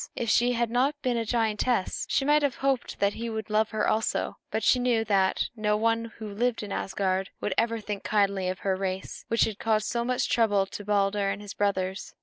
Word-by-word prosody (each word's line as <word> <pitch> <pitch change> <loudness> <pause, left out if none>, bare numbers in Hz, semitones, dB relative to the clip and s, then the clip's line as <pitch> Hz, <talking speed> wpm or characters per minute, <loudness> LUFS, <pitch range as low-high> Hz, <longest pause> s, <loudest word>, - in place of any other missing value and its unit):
If 230 -3 -1
she 245 +3 +3
had 235 -1 0
not 270 +5 +1
been 250 -2 +1
a 230 - 0
giantess, 225 -1 0
she 270 - +1
might 295 +1 +4
have 285 -3 0
hoped 270 -2 -1
that 200 0 +2
he 230 +1 -4
would 220 -1 -5
love 215 +1 +2
her 215 - 0
also; 220 - 0
but - - -2
she 250 - +4
knew 240 -3 +1
that 195 -3 +2
no 210 -1 +1
one 230 +1 +1
who 220 - -6
lived 240 +1 0
in 205 - -7
Asgard 190 -1 -1
would 205 - -1
ever 230 +1 +1
think 210 -2 -5
kindly 200 -3 +1
of 185 - -4
her 195 -1 +1
race, 190 0 -4
which 230 - +2
had 215 -2 -2
caused 215 -1 +1
so 235 0 -1
much 250 +1 0
trouble 205 -4 +2
to 205 - -8
Balder 200 0 +1
and 195 0 -3
his 205 -1 -8
brothers. 190 -2 -2
215 Hz, 220 wpm, -27 LUFS, 200-235 Hz, -, might